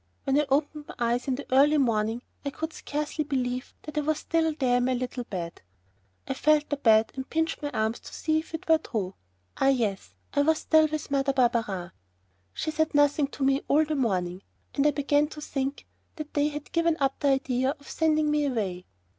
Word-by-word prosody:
When 275 Hz, +1 st, +2 dB
I 295 Hz, -, -3 dB
opened 295 Hz, +2 st, 0 dB
my -, -, -9 dB
eyes 240 Hz, +2 st, 0 dB
in 265 Hz, -, +1 dB
the 285 Hz, -, -7 dB
early 290 Hz, +3 st, +5 dB
morning 230 Hz, -2 st, +1 dB, 0.2 s
I 285 Hz, -, -1 dB
could 320 Hz, +3 st, -5 dB
scarcely 300 Hz, +1 st, -3 dB
believe 255 Hz, -3 st, -2 dB
that 305 Hz, 0 st, -3 dB
I -, -, +1 dB
was 310 Hz, +1 st, 0 dB
still 325 Hz, 0 st, +1 dB
there 250 Hz, -4 st, +2 dB
in 245 Hz, -, +1 dB
my 255 Hz, 0 st, +1 dB
little 250 Hz, 0 st, -4 dB
bed. 170 Hz, -5 st, -6 dB, 0.7 s
I -, -, -1 dB
felt 300 Hz, +2 st, +2 dB
the 290 Hz, -, +1 dB
bed 220 Hz, -4 st, +4 dB
and 265 Hz, 0 st, -6 dB
pinched 320 Hz, 0 st, -1 dB
my 290 Hz, -, -2 dB
arms 220 Hz, -3 st, -1 dB
to -, -, -12 dB
see 315 Hz, -1 st, +1 dB
if 320 Hz, +1 st, -7 dB
it 320 Hz, -, -8 dB
were 320 Hz, -1 st, +5 dB
true. 200 Hz, -10 st, -3 dB, 0.4 s
Ah, 270 Hz, -, +2 dB
yes, 225 Hz, -8 st, 0 dB, 0.2 s
I 285 Hz, -, +3 dB
was 315 Hz, +2 st, +3 dB
still 315 Hz, 0 st, +4 dB
with 305 Hz, -1 st, -5 dB
Mother 275 Hz, 0 st, +1 dB
Barberin. 225 Hz, -8 st, 0 dB, 0.6 s
She 315 Hz, -, -3 dB
said 315 Hz, 0 st, 0 dB
nothing 290 Hz, 0 st, +4 dB
to 275 Hz, -, -5 dB
me 270 Hz, +1 st, +3 dB
all 305 Hz, +2 st, +4 dB
the 310 Hz, -, -2 dB
morning, 185 Hz, -9 st, -1 dB, 0.3 s
and 285 Hz, +1 st, +3 dB
I -, -, +6 dB
began 290 Hz, +1 st, +2 dB
to 305 Hz, -, -10 dB
think 275 Hz, -1 st, -3 dB, 0.3 s
that 305 Hz, -2 st, -7 dB
they 290 Hz, 0 st, +2 dB
had 295 Hz, -1 st, -6 dB
given 335 Hz, -1 st, +2 dB
up 270 Hz, -1 st, 0 dB
the 290 Hz, -, +1 dB
idea 265 Hz, 0 st, +1 dB
of 285 Hz, -, -17 dB
sending 310 Hz, -2 st, +1 dB
me 300 Hz, -1 st, +2 dB
away. 195 Hz, -8 st, -3 dB
280 Hz, 215 wpm, -27 LUFS, 245-300 Hz, 0.7 s, I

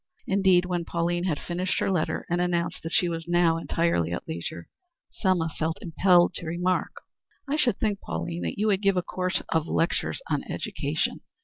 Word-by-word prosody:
Indeed, 190 Hz, -2 st, +4 dB
when 175 Hz, -1 st, -1 dB
Pauline 175 Hz, +1 st, -1 dB
had 160 Hz, -6 st, 0 dB
finished 180 Hz, +2 st, -2 dB
her -, -, +1 dB
letter 175 Hz, -4 st, 0 dB
and 175 Hz, +1 st, 0 dB
announced 175 Hz, -1 st, 0 dB
that 165 Hz, -, -5 dB
she 185 Hz, -2 st, +3 dB
was 165 Hz, -1 st, -4 dB
now 175 Hz, -1 st, +3 dB
entirely 165 Hz, -, 0 dB
at 85 Hz, -, -4 dB
leisure, 85 Hz, +1 st, -5 dB, 0.4 s
Selma 185 Hz, -5 st, +1 dB
felt 160 Hz, 0 st, -2 dB
impelled 175 Hz, +1 st, +4 dB
to 170 Hz, -, -7 dB
remark: 180 Hz, +3 st, 0 dB, 0.6 s
"I 280 Hz, -, 0 dB
should 250 Hz, -9 st, +2 dB
think, 210 Hz, -3 st, 0 dB
Pauline, 85 Hz, +1 st, -4 dB
that 85 Hz, -, -3 dB
you 210 Hz, -, +1 dB
would 200 Hz, -2 st, +2 dB
give 195 Hz, -2 st, +3 dB
a 180 Hz, -, +1 dB
course 185 Hz, 0 st, -2 dB
of 160 Hz, -1 st, +1 dB
lectures 170 Hz, -, 0 dB
on -, -, 0 dB
education. -, -, -2 dB
175 Hz, 185 wpm, -27 LUFS, 165-185 Hz, 0.6 s, Indeed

